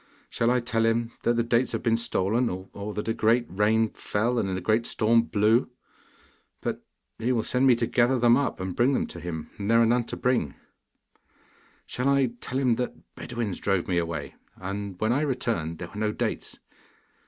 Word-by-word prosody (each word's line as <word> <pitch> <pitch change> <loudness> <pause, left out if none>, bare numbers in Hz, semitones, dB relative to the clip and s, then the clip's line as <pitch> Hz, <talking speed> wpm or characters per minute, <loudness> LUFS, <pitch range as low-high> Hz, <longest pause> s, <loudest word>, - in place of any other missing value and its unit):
Shall 115 - +1
I 125 0 +3
tell 115 -1 0
him 115 +1 +1
that 120 - +2
the 115 - +2
dates 115 +2 +1
have - - -2
been 115 -2 +3
stolen, 115 0 0
or 95 +3 -6
that 105 - -4
a 115 - +1
great 115 +2 +2
rain 110 +3 +2
fell 115 +4 -1
and 95 - -1
a - - -2
great 110 +6 +1
storm 115 +1 +3
blew? 115 +2 +2 0.9
But - - -4 0.4
he 115 +3 0
will 115 -3 +1
send 130 +1 +2
me 125 - +6
to 115 - 0
gather 125 +2 +2
them 120 0 +5
up 140 +1 -1
and 95 -1 -4
bring 130 +4 +3
them - - +1
to 85 - -9
him, 80 -2 -6
and 100 +1 -3
there 115 0 +5
are 115 - +5
none 120 +1 +2
to - - -5
bring! 125 - 0 1.3
Shall 125 +2 -1
I 135 -3 +3
tell 130 - -3
him 125 -4 +2
that 125 - -2 0.2
Bedouins 115 -6 -4
drove 95 -3 0
me 90 -2 +1
away, 80 -3 -4 0.2
and 100 0 -5
when 110 +2 +2
I 140 - +1
returned 115 - -1
there 85 0 -7
were 105 - -8
no 110 0 +1
dates? - - -3
115 Hz, 200 wpm, -26 LUFS, 100-120 Hz, 1.3 s, me